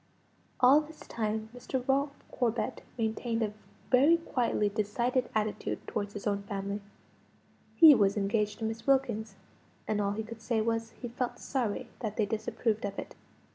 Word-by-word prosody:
All 265 +4 +7
this 305 +1 -12
time, 220 -1 -3
Mr. 250 +1 -4
Ralph 280 +1 0
Corbet 240 -2 -1 0.2
maintained 225 0 -1
a 210 -1 -2 0.4
very 280 +6 +6
quietly 245 -9 0
decided 235 +5 0
attitude 215 -1 -1
towards 205 -1 -3
his 205 - -7
own 200 -1 0
family. 200 0 -4 0.9
He 320 -3 +10
was 200 -4 +3
engaged 210 +1 0
to 225 - -3
Miss 225 +3 -4
Wilkins; 230 -6 +1 0.5
and 210 -1 +1
all 200 0 0
he 220 +2 -3
could 225 0 -9
say 225 0 0
was, 225 +1 0
he 240 - -5
felt 245 +1 -3
sorry 245 -7 -2
that 215 -3 -4
they 215 - +3
disapproved 220 +1 -1
of 200 -1 -3
it. - - -6
225 Hz, 160 wpm, -30 LUFS, 210-250 Hz, 0.9 s, He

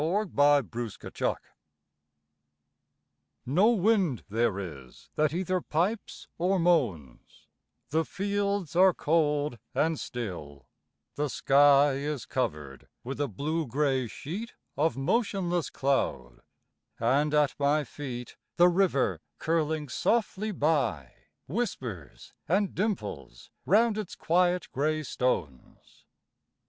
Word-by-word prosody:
AN 195 +5 0
AUTUMN 145 -7 +4
LANDSCAPE 115 -3 -3 2.1
No 180 - +4
wind 195 - +2
there 110 -1 +1
is 75 -10 -9
that 150 -1 +1
either 185 +2 -1
pipes 185 +9 -2
or 185 +3 +2
moans; 120 - -1 0.5
The 160 +2 +2
fields 200 -2 -2
are 185 0 +6
cold 150 -5 +1 0.2
and 160 -1 +1
still; 85 - -6 0.5
the 150 0 0
sky 140 +2 +5
Is 145 -1 -3
covered 75 - -4 0.2
with 135 +4 -4
a 145 - +1
blue 150 - -2
gray 135 0 0
sheet 190 - -7 0.2
Of 150 -3 +1
motionless 180 - 0
cloud; 70 - -1 0.6
and 140 +6 +2
at 150 -2 +3
my 145 +2 +2
feet 125 -3 -7 0.2
The 175 +1 +7
river, 175 -7 +1 0.2
curling 160 -2 0
softly 215 - 0
by, 145 - 0 0.3
Whispers 125 - -5
and 195 +4 +1
dimples 105 - -4 0.2
round 215 +2 +4
its 210 - -6
quiet 180 +1 +1
gray 155 +3 0
stones. 120 - -4
150 Hz, 105 wpm, -28 LUFS, 125-180 Hz, 2.1 s, The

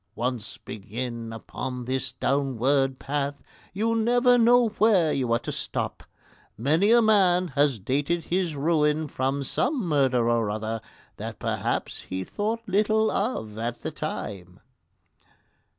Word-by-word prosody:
Once 120 -2 -3
begin 115 +2 -6
upon 125 +2 -6
this 130 +1 -2
downward 135 0 +1
path, 140 +1 -3 0.3
you 220 +4 0
never 245 +2 +4
know 240 0 +5
where 195 -8 +4
you 125 -3 -1
are 115 - +4
to - - -5
stop. - - -3 0.6
Many 155 - +2
a 235 0 +6
man 185 -5 +4
has 140 -2 +2
dated 145 - -1
his 175 -3 -1
ruin 150 +1 +1
from 135 +1 -1
some 255 - 0
murder 130 -6 +2
or 115 -2 +2
other 110 +1 -3 0.4
that - - -6
perhaps - - -2
he 95 0 -4
thought 220 - -2
little 215 +3 +2
of 110 - -2
at 120 +1 -3
the 155 - -3
time. 100 - -6
140 Hz, 135 wpm, -26 LUFS, 120-195 Hz, 0.6 s, a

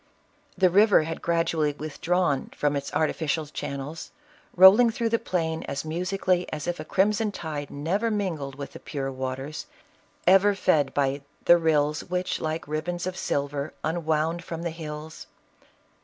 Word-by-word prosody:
The 185 -2 +4
river 205 -2 +5
had 165 +1 -5
gradually 165 -3 +1
withdrawn 155 0 -1
from 145 -1 +1
its 140 0 -3
artificial 155 0 0
channels, 145 +1 -6 0.5
roiling 200 +6 +8
through 230 0 -1
the 230 0 +1
plain 160 -6 -2
as 140 +2 -4
musically 180 +2 -1
as 150 -1 -4
if 175 -1 -3
a - - -4
crimson 210 +6 +1
tide 150 -6 -5
never 185 +11 -1
min 200 -5 -1
gled 140 -2 -6
with 140 0 -8
the - - -9
pure 135 -2 -4
waters, 130 +3 -5 0.6
ever 195 +3 +5
fed 150 -8 +2
by 140 0 +1
" - - -36
the - - +8
rillfl 150 -3 +2
That 180 0 -1
like 155 0 -3
ribands 170 +4 -3
of 185 0 -3
silver 140 -3 -2
unwound 160 +1 0
from 165 0 -6
the 170 - -2
hills." 155 -1 -8
160 Hz, 155 wpm, -26 LUFS, 145-180 Hz, 0.6 s, roiling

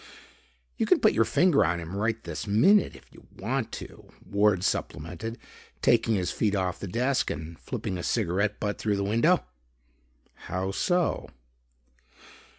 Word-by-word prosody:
"You - - 0
can - - +5
put - - +4
your 115 +1 +3
finger 175 +1 +4
on 85 +2 0
him 85 +3 -7
right 110 +2 -1
this 85 +1 -5
minute 155 - +4
if - - -17
you - - -17
want - - -2
to," - - -9 0.2
Ward 100 -2 +2
supplemented, 90 +9 -3 0.5
taking 115 -1 +3
his 90 -3 -1
feet 105 -2 0
off 95 -1 -1
the 100 - -5
desk 125 +7 0
and 80 +2 -6
flipping 95 - -4
a - - -5
cigarette 100 +4 0
butt 105 -1 -2
through 105 -2 0
the 100 - -1
window. 115 - +2 1.0
"How 95 +1 -2
so?" 175 - 0
100 Hz, 155 wpm, -27 LUFS, 90-115 Hz, 1.0 s, can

